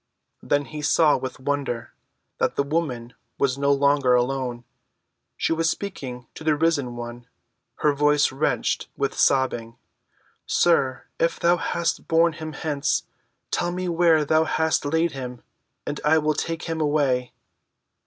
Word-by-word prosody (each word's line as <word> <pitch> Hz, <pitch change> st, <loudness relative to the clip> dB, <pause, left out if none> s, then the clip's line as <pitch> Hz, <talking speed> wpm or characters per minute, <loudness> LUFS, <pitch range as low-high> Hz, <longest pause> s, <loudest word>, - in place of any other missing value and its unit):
Then 145 Hz, 0 st, 0 dB
he 150 Hz, +2 st, -7 dB
saw 150 Hz, +1 st, +4 dB
with 130 Hz, 0 st, -5 dB
wonder 135 Hz, -4 st, -3 dB, 0.5 s
that -, -, +1 dB
the 140 Hz, -, +1 dB
woman 140 Hz, -6 st, -2 dB, 0.2 s
was 140 Hz, -1 st, 0 dB
no 140 Hz, 0 st, +2 dB
longer 140 Hz, -2 st, +3 dB
alone. 125 Hz, -1 st, -1 dB, 0.7 s
She -, -, +1 dB
was 165 Hz, 0 st, +1 dB
speaking 130 Hz, -11 st, -5 dB
to -, -, -10 dB
the 155 Hz, -1 st, +3 dB
Risen 145 Hz, -6 st, 0 dB
One, 120 Hz, 0 st, -8 dB, 0.6 s
her 150 Hz, -, +5 dB
voice 150 Hz, 0 st, +3 dB
wrenched 135 Hz, -, -1 dB
with -, -, -1 dB
sobbing: 120 Hz, -4 st, +1 dB, 0.7 s
"Sir, 135 Hz, -7 st, +2 dB, 0.2 s
if 165 Hz, 0 st, +1 dB
thou 175 Hz, +1 st, +3 dB
hast 170 Hz, 0 st, -2 dB
borne 165 Hz, 0 st, +3 dB
him 155 Hz, -1 st, -7 dB
hence, 145 Hz, -1 st, -1 dB, 0.5 s
tell 175 Hz, 0 st, 0 dB
me 180 Hz, +1 st, -3 dB
where 165 Hz, -3 st, +3 dB
thou 155 Hz, +2 st, +3 dB
hast 160 Hz, -1 st, +1 dB
laid 160 Hz, +3 st, +1 dB
him, 125 Hz, -3 st, -7 dB, 0.4 s
and 145 Hz, -, -4 dB
I 155 Hz, +2 st, +4 dB
will 155 Hz, 0 st, +2 dB
take 165 Hz, +2 st, -3 dB
him 165 Hz, -1 st, -3 dB
away." 140 Hz, -5 st, +1 dB
145 Hz, 145 wpm, -24 LUFS, 130-160 Hz, 0.7 s, her